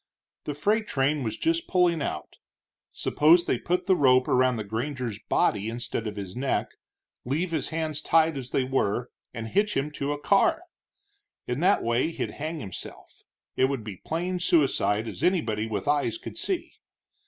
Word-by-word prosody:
The 150 - -3
freight 210 +8 +1
train 145 +2 +1
was 110 -4 -2
just 335 +1 0
pulling 175 -3 +2
out; 75 - -4 0.5
suppose 170 +3 +4
they - - 0
put 180 +1 -1
the 190 - +4
rope 130 -5 +4
around 130 0 +3
the 110 - -3
granger's 115 +1 -3
body 105 +1 +2
instead 115 -1 -4
of 105 - -5
his 100 -3 -6
neck, 130 +2 -1 0.5
leave 160 +8 -1
his 155 -5 -1
hands 155 -2 -2
tied 160 -1 +3
as 130 -2 -6
they 135 - +1
were, 125 -2 -1 0.2
and 115 -1 -6
hitch 210 - +1
him 140 +2 -1
to 145 -1 -3
a 145 - -3
car! 320 - +3 0.8
In 125 +2 -2
that 185 +5 +3
way 120 +6 +1
he'd 165 - -4
hang 155 +1 -5
himself. 95 -5 -8 0.3
It 130 - +4
would 135 -4 -2
be 105 -4 -7
plain 175 - -3
suicide, 135 -10 +2
as - - -6
anybody 120 - +1
with 105 0 -4
eyes 145 - +1
could 355 - -9
see. 375 -3 -2
145 Hz, 175 wpm, -26 LUFS, 120-170 Hz, 0.8 s, suppose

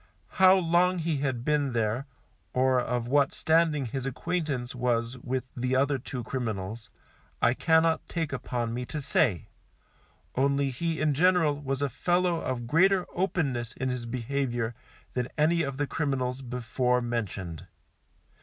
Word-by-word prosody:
How 190 0 +9
long 180 +1 +3
he 165 -2 -1
had 135 -3 -2
been 145 -3 +1
there, 115 +4 0 0.5
or 130 0 +3
of 120 -1 -2
what 140 +2 +2
standing 160 -3 +2
his 130 +2 -4
acquaintance 140 -3 -2
was 120 -1 0
with 125 +1 -2
the 125 +1 0
other 140 +1 +2
two 125 -1 -6
criminals, 110 -3 -4 0.5
I 120 - +4
cannot 160 +2 +2
take 165 -5 -2
upon 120 -3 -2
me 125 +1 -3
to 150 - -4
say, 130 - +1 0.9
only 140 +1 +1
he 165 +5 -2
in 155 -1 +2
general 160 -2 +3
was 135 0 -2
a - - +2
fellow 175 +5 +1
of 125 -2 -3
greater 180 +8 +4
openness 140 - -1
in 130 0 -2
his 125 -2 -3
behaviour 120 -1 -2 0.4
than 125 -1 -1
any 165 +3 +3
of 140 -4 -3
the 145 - 0
criminals 135 -3 -2
before 125 0 0
mentioned. 105 -9 -4
135 Hz, 145 wpm, -28 LUFS, 120-155 Hz, 0.9 s, How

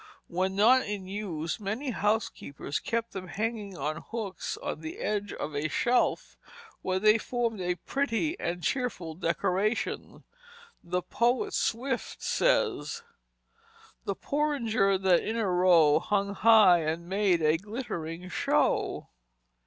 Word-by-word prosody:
When 185 +2 -1
not 240 +6 +5
in 200 -2 -4
use 185 -5 -4
many 220 +7 -3
housekeepers 205 -10 -2
kept 230 0 -2
them 185 -1 -6
hanging 210 -2 -3
on 150 +3 -2
hooks 210 -6 -5
on - - -5
the 160 0 -6
edge 205 -1 -2
of 150 0 -5
a 145 +2 0
shelf, 245 +10 0 0.4
where 185 0 -1
they 215 +3 +5
formed 230 -3 -2
a 180 0 0
pretty 280 - -1
and 175 0 -3
cheerful 245 -11 -2
decoration. 185 +5 -1 0.6
The 180 +1 -2
poet 240 +1 0
Swift 250 +2 -2
says: 475 -1 +1 1.0
"The - - -1
porringers 230 -10 +1
that 185 -2 +4
in 225 +2 -2
a 220 -3 0
row 175 -4 +5
Hung 200 -1 -1
high 210 -4 +6
and 165 +2 -3
made 190 -3 +2
a 155 +1 +4
glittering 180 -5 -6
show." - - 0
200 Hz, 130 wpm, -28 LUFS, 175-230 Hz, 1.0 s, high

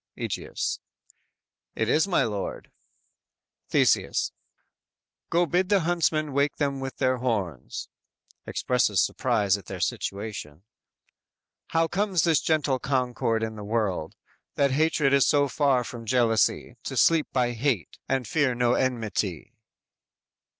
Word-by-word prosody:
"_ - - -66 0.2
Egeus: - - -3 1.0
"It 110 - 0
is, 155 - +3
my 190 - +2
lord." 105 -3 -4 1.0
Theseus: - - +2 1.0
"Go 175 +1 +3
bid 180 +2 0
the 200 -2 +4
huntsmen 155 -3 0
wake 140 +1 +1
them 140 -2 -1
with 135 0 -6
their 130 -1 +1
horns. 100 - -3 0.6
(Expresses 115 -6 +1
surprise 100 +2 +1
at 95 - -17
their - - -6
situation.) 100 -6 -4 1.1
_How 165 0 +3
comes 190 -2 +1
this 165 -3 +3
gentle 150 -4 +1
concord 125 -4 0
in 110 0 -3
the 105 - -8
world, 100 -7 -2 0.4
That 140 -1 +2
hatred 150 -1 +2
is 140 -1 +5
so 145 -1 +3
far 135 -2 +2
from 115 -1 -8
jealousy, 115 -2 +1
To - - -4
sleep 165 -2 +4
by 125 -2 +1
hate, 120 - -2
and 130 -3 0
fear 135 0 +1
no 120 0 +2
enmity." 110 - -2
130 Hz, 130 wpm, -26 LUFS, 110-150 Hz, 1.1 s, is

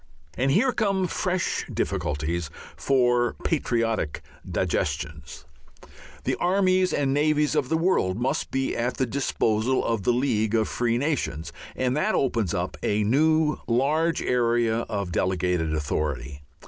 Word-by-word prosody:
And 130 +2 +1
here 225 - +3
come 200 -5 0
fresh 180 +1 -1
difficulties 75 +2 -2 0.3
for 120 -3 +2
patriotic 115 - -1 0.3
digestions. 75 -1 -3 0.8
The - - 0
armies 185 0 +2
and 135 -2 +1
navies 150 +1 +2
of 130 - 0
the 160 - +2
world 165 - +1
must 135 +5 -1
be 135 0 -1
at 120 +2 -1
the 130 - +1
disposal 120 -1 0
of 115 -3 0
the 110 - +2
League 115 -4 +1
of 110 -1 +2
Free 120 -1 0
Nations, 130 - -2 0.2
and 130 0 0
that 185 +9 +1
opens 115 -9 0
up - - -3
a 105 +1 +1
new 155 +6 +2
large 150 +8 +1
area 120 -2 +2
of 100 -5 -3
delegated 90 -2 0
authority. 75 -2 -2
120 Hz, 135 wpm, -25 LUFS, 105-150 Hz, 0.8 s, here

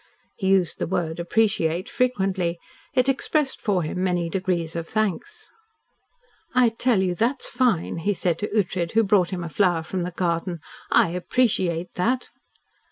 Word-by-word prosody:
He 190 - -3
used 190 -3 +2
the - - -1
word 175 -2 -2
"appreciate" 175 -2 +1
frequently. 190 -8 0 0.4
It 255 0 +3
expressed 275 +1 0
for 195 -5 +1
him 180 +4 -3
many 175 -2 0
degrees 175 -3 -1
of 165 -1 -4
thanks. 215 - -3 1.0
"I 250 -2 +5
tell 225 -3 +1
you 180 -1 0
that's 235 +9 0
fine," 230 -12 0
he 200 +5 0
said 170 -2 0
to 210 - -1
Ughtred, 180 -5 -1
who 225 0 +4
brought 190 -3 +3
him 180 -2 -4
a - - -4
flower 175 -1 +2
from 180 +3 -3
the 175 - -2
garden. 170 0 -1 0.3
"I - - +5
appreciate 180 -2 0
that." 245 +8 0
185 Hz, 160 wpm, -24 LUFS, 170-220 Hz, 1.0 s, I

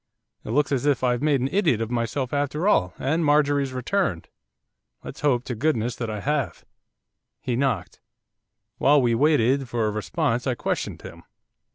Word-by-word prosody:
It - - -9
looks 145 +6 +1
as 140 0 0
if 140 -3 +1
I've 125 -1 +1
made 145 -3 +2
an 130 - 0
idiot 170 - +2
of 115 0 -3
myself 120 +2 -2
after 145 +5 -1
all, 95 - +2
and 160 +5 0
Marjorie's 145 -2 +2
returned, 130 - -2 0.7
let's - - -9
hope 130 -5 +2
to 125 - -4
goodness 120 -2 0
that 115 -2 -3
I 105 -1 -4
have.' 145 -2 -2 0.7
He 125 - -2
knocked. 125 -8 -1 0.8
While 145 +2 +5
we 120 -3 +2
waited 135 -1 +2
for 115 -2 0
a 105 - 0
response 125 +3 -1
I 130 - +1
questioned - - -3
him. - - -10
130 Hz, 170 wpm, -24 LUFS, 120-145 Hz, 0.8 s, While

